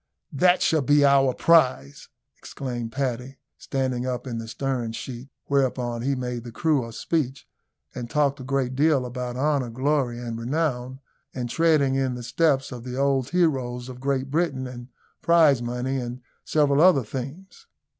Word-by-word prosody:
"That 180 Hz, +6 st, +4 dB
shall 160 Hz, -2 st, +3 dB
be 145 Hz, +2 st, +4 dB
our 135 Hz, -1 st, +5 dB
prize," 125 Hz, -, +2 dB, 0.3 s
exclaimed 120 Hz, -4 st, -6 dB
Paddy, 130 Hz, 0 st, -3 dB, 0.2 s
standing 130 Hz, -2 st, -2 dB
up 125 Hz, 0 st, -3 dB
in 120 Hz, -3 st, -4 dB
the 115 Hz, -, -7 dB
stern 125 Hz, -2 st, -3 dB
sheets; 125 Hz, +2 st, -7 dB, 0.2 s
whereon 125 Hz, -4 st, 0 dB
he 135 Hz, +3 st, 0 dB
made 125 Hz, -2 st, -4 dB
the 120 Hz, -, -8 dB
crew 145 Hz, +3 st, +1 dB
a -, -, -9 dB
speech, 140 Hz, +2 st, -2 dB, 0.5 s
and 120 Hz, -2 st, -6 dB
talked 145 Hz, -1 st, +1 dB
a -, -, -7 dB
great 130 Hz, -1 st, -1 dB
deal 145 Hz, -2 st, +3 dB
about 125 Hz, 0 st, -5 dB
honour, 140 Hz, -2 st, +1 dB
glory, 130 Hz, 0 st, 0 dB
and 115 Hz, -2 st, -5 dB
renown, 130 Hz, -1 st, -2 dB, 0.3 s
and 120 Hz, -2 st, -3 dB
treading 155 Hz, -4 st, +3 dB
in 135 Hz, -2 st, 0 dB
the 125 Hz, -, -7 dB
steps 135 Hz, +2 st, +1 dB
of 120 Hz, -2 st, -7 dB
the 125 Hz, 0 st, -6 dB
old 135 Hz, -2 st, +1 dB
heroes 130 Hz, -8 st, 0 dB
of 125 Hz, -1 st, -9 dB
Great 135 Hz, 0 st, -1 dB
Britain, 145 Hz, -5 st, 0 dB
and 120 Hz, -1 st, -8 dB, 0.3 s
prize 160 Hz, -7 st, +5 dB
money, 125 Hz, +2 st, -2 dB
and 125 Hz, 0 st, -5 dB, 0.2 s
several 145 Hz, -1 st, +2 dB
other 170 Hz, -7 st, +6 dB
themes. 140 Hz, -, -8 dB
130 Hz, 165 wpm, -25 LUFS, 125-140 Hz, 0.5 s, other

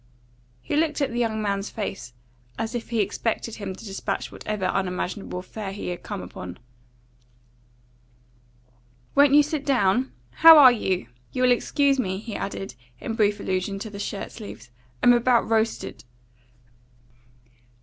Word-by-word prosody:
He -, -, -2 dB
looked 310 Hz, 0 st, +1 dB
at 280 Hz, -2 st, 0 dB
the 240 Hz, -, -2 dB
young 220 Hz, -2 st, 0 dB
man's 200 Hz, 0 st, -1 dB
face, 195 Hz, -, -5 dB, 0.4 s
as 225 Hz, +1 st, -3 dB
if 240 Hz, -2 st, -5 dB
he 230 Hz, -2 st, +1 dB
expected 220 Hz, +3 st, -2 dB
him 195 Hz, -3 st, -5 dB
to 210 Hz, -, -12 dB
despatch 195 Hz, -2 st, -4 dB
whatever 210 Hz, -3 st, -4 dB
unimaginable 185 Hz, 0 st, -2 dB
affair 195 Hz, +2 st, -6 dB
he 195 Hz, -2 st, -5 dB
had 175 Hz, -, -5 dB
come 205 Hz, -3 st, -6 dB
upon. 90 Hz, 0 st, -8 dB, 2.6 s
"Won't 285 Hz, 0 st, +6 dB
you 295 Hz, -, +8 dB
sit 300 Hz, -1 st, -3 dB
down? 250 Hz, -3 st, +2 dB, 0.3 s
How 325 Hz, 0 st, +10 dB
are 265 Hz, -4 st, +10 dB
you? 190 Hz, -, -1 dB, 0.3 s
You'll 255 Hz, -1 st, +3 dB
excuse 275 Hz, +2 st, +2 dB
me," 190 Hz, -6 st, -1 dB
he 215 Hz, +1 st, -7 dB
added, 195 Hz, 0 st, -5 dB, 0.3 s
in 225 Hz, -, -4 dB
brief 210 Hz, -2 st, +2 dB
allusion 190 Hz, +1 st, -2 dB
to 210 Hz, +2 st, -7 dB
the 200 Hz, -, -8 dB
shirt 200 Hz, 0 st, -4 dB
sleeves. 120 Hz, -, -10 dB, 0.3 s
"I'm 245 Hz, -, +7 dB
about 240 Hz, 0 st, +3 dB
roasted." 225 Hz, 0 st, -1 dB
215 Hz, 145 wpm, -25 LUFS, 195-245 Hz, 2.6 s, How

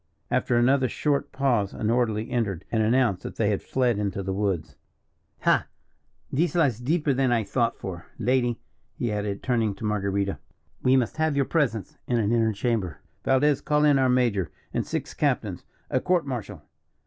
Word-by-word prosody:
After 120 Hz, -, +2 dB
another 130 Hz, +2 st, +3 dB
short 145 Hz, +2 st, 0 dB
pause 120 Hz, -8 st, +1 dB
an 110 Hz, +1 st, 0 dB
orderly 115 Hz, -1 st, 0 dB
entered, 100 Hz, -8 st, -1 dB
and 115 Hz, -, +2 dB
announced 115 Hz, -3 st, +2 dB
that -, -, -7 dB
they 105 Hz, -2 st, +1 dB
had 100 Hz, -, -1 dB
fled 125 Hz, -5 st, +1 dB
into 100 Hz, -1 st, -2 dB
the 95 Hz, 0 st, -2 dB
woods. 90 Hz, -7 st, -2 dB, 0.7 s
"Ha! -, -, +3 dB, 0.7 s
this 170 Hz, +6 st, +1 dB
lies 140 Hz, -10 st, +2 dB
deeper 150 Hz, +3 st, +1 dB
than 130 Hz, -1 st, +2 dB
I 115 Hz, -2 st, +2 dB
thought 115 Hz, +3 st, 0 dB
for, 85 Hz, -3 st, -7 dB
lady," 120 Hz, 0 st, +1 dB, 0.4 s
he 120 Hz, -, -2 dB
added, 105 Hz, -1 st, -3 dB
turning 115 Hz, -5 st, +1 dB
to 105 Hz, -, -6 dB
Marguerita; 100 Hz, -2 st, -1 dB, 0.4 s
"we 130 Hz, +1 st, +4 dB
must 125 Hz, 0 st, +1 dB
have 160 Hz, -2 st, +1 dB
your 140 Hz, -1 st, +2 dB
presence 125 Hz, -, -1 dB
in 120 Hz, -, +1 dB
an 110 Hz, -2 st, +1 dB
inner 115 Hz, -1 st, +3 dB
chamber. 100 Hz, -, -1 dB, 0.2 s
Valdez, 140 Hz, +2 st, +3 dB
call 150 Hz, 0 st, +2 dB
in 145 Hz, -2 st, +5 dB
our 130 Hz, -1 st, +3 dB
major 115 Hz, -, +2 dB, 0.2 s
and -, -, -1 dB
six -, -, -3 dB
captains, -, -, -1 dB, 0.3 s
a 130 Hz, -, +2 dB
court 180 Hz, +2 st, +1 dB
martial. 125 Hz, -6 st, -5 dB
120 Hz, 175 wpm, -26 LUFS, 105-130 Hz, 0.7 s, in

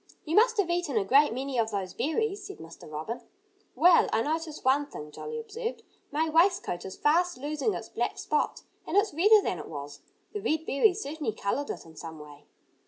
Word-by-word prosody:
"You 320 Hz, +1 st, -1 dB
must 465 Hz, +2 st, +5 dB
have 375 Hz, -4 st, +2 dB
eaten 345 Hz, -8 st, 0 dB
a 200 Hz, -, +2 dB
great 280 Hz, +6 st, +5 dB
many 260 Hz, +1 st, -2 dB
of 220 Hz, -1 st, +1 dB
those 195 Hz, -4 st, -3 dB
berries," 405 Hz, -, -1 dB
said 395 Hz, -, -9 dB
Mr. 165 Hz, -1 st, -12 dB
Robin. 160 Hz, +11 st, -5 dB, 0.5 s
"Well, 340 Hz, +6 st, +6 dB
I 225 Hz, -, +2 dB
notice 315 Hz, 0 st, -3 dB
one 280 Hz, +2 st, +3 dB
thing," 150 Hz, -, -9 dB
Jolly 460 Hz, -, -6 dB
observed. 460 Hz, +1 st, -5 dB, 0.3 s
"My 310 Hz, +3 st, +1 dB
waistcoat 330 Hz, -, +2 dB
is 190 Hz, -, -7 dB
fast 345 Hz, +4 st, +2 dB
losing 300 Hz, +9 st, -1 dB
its -, -, -7 dB
black -, -, -2 dB
spots. 455 Hz, -, -1 dB, 0.2 s
And -, -, 0 dB
it's 410 Hz, -3 st, +3 dB
redder 410 Hz, +6 st, +6 dB
than 180 Hz, -, -2 dB
it -, -, -8 dB
was. 145 Hz, -1 st, -7 dB, 0.3 s
The 415 Hz, -, -3 dB
red 320 Hz, -6 st, 0 dB
berries 370 Hz, +9 st, +2 dB
certainly 290 Hz, -6 st, -3 dB
colored 220 Hz, +8 st, -2 dB
it -, -, -5 dB
in 160 Hz, -1 st, -15 dB
some 160 Hz, 0 st, -8 dB
way." 145 Hz, -1 st, -13 dB
295 Hz, 200 wpm, -28 LUFS, -, 0.5 s, Well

